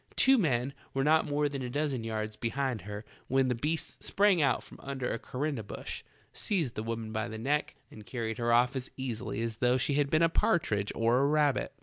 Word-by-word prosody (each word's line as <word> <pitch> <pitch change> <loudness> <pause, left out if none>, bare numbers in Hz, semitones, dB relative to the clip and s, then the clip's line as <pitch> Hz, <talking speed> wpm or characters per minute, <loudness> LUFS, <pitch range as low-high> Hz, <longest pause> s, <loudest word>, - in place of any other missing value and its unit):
Two 265 -1 +5
men 135 - +1 0.2
were 135 - +2
not 155 +2 +4
more 145 0 +1
than 140 -2 -4
a 125 - -3
dozen 140 -2 -1
yards 110 -1 -3
behind 120 0 -2
her 105 +3 -7 0.2
when 135 0 +2
the - - +2
beast 150 +7 -3
sprang 200 -4 +3
out 135 -4 +2
from - - -13
under 135 -2 -3
a 115 - -2
korinda 140 -1 -3
bush, 105 - -6 0.3
seized 165 - -1
the - - -3
woman 115 0 -4
by 110 +1 -2
the 110 -1 -6
neck 145 +6 0 0.2
and 110 - -11
carried 115 +1 -4
her 120 0 +1
off 125 +3 +4
as 130 -1 -4
easil}" 125 -4 -4
as 115 -1 -2
though 125 +1 +3
she 135 +3 +1
had 140 0 +2
been 155 +2 +3
a - - +7
partridge 105 -11 +1
or 115 +2 +3
a 140 - +3
rabbit. 150 -2 +2
130 Hz, 220 wpm, -30 LUFS, 115-145 Hz, 0.3 s, a